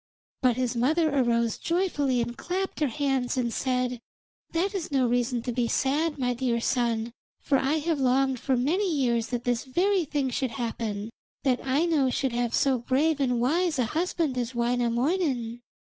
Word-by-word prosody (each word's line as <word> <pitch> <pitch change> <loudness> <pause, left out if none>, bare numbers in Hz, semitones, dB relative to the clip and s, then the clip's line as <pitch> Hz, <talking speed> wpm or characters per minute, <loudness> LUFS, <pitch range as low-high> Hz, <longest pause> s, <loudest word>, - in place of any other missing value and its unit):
But 250 -2 +3
his 250 -1 -1
mother 305 +5 +2
arose 235 -3 +1
joyfully 295 -8 0
and 240 +1 -6
clapped 375 +6 -3
her 300 - +2
hands 265 -1 -1
and 240 -2 0
said: 250 -2 -1 0.5
'That 370 +5 0
is 365 -6 -4
no 265 -2 +2
reason 245 0 0
to 245 - -2
be 240 0 0
sad, 295 +6 0
my 250 -2 0
dear 240 -1 0
son, 235 -2 0 0.3
for 275 -2 +1
I 270 +3 +1
have 315 0 0
longed 265 0 +2
for 260 +1 0
many 350 +10 +1
years 240 -6 +1
that 245 -1 -3
this 245 -1 0
very 360 +7 +1
thing 280 -3 -1
should 245 -2 -2
happen 225 -3 -3 0.3
that 255 -2 +1
Aino 285 0 +2
should 260 0 -1
have 240 -1 0
so 265 -3 +2
brave 280 +5 +1
and 250 -3 +1
wise 320 +6 +1
a 250 - +2
husband 320 -5 0
as 245 +1 -3
Wainamoinen.' 240 +1 0
260 Hz, 175 wpm, -27 LUFS, 240-300 Hz, 0.5 s, But